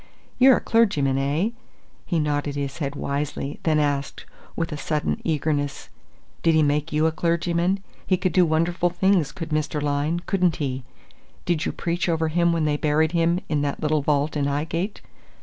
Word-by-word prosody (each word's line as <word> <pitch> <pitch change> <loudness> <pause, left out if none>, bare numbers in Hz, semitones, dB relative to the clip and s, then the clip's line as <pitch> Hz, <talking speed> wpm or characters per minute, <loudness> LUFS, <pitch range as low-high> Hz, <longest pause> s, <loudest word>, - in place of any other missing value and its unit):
You're 260 0 +7
a - - -4
clergyman, 145 -13 +2
eh?" 150 +10 0 0.6
He 175 - 0
nodded 145 -2 -1
his 140 0 -4
head 140 -2 -3
wisely, 140 0 -3
then 155 -2 +2
asked, 145 -2 -1 0.3
with 165 0 -2
a - - -3
sudden 150 +1 -2
eagerness: 145 -3 -1 0.5
"Did 165 -1 +3
he 155 - +5
make 150 +2 0
you 150 +1 +2
a 160 - +3
clergyman? 170 +3 0 0.2
He 185 - +3
could 185 -2 -1
do 185 - +5
wonderful 170 +2 +1
things, 180 -3 +2
could 165 -4 -6
Mr. 155 0 -1
Lyne, 145 +3 0
couldn't 180 -3 +1
he? 130 -3 -3 0.6
Did 170 -3 0
you - - -1
preach 170 0 -2
over 160 -1 +1
him 170 +2 +2
when 165 -2 +1
they 150 -1 +1
buried 155 +1 +2
him 170 +1 +2
in 150 -2 0
that 145 -1 -2
little 155 -1 +1
vault 145 +1 0
in 145 -1 0
'Ighgate? 165 +8 -2
155 Hz, 180 wpm, -24 LUFS, 145-170 Hz, 0.6 s, You're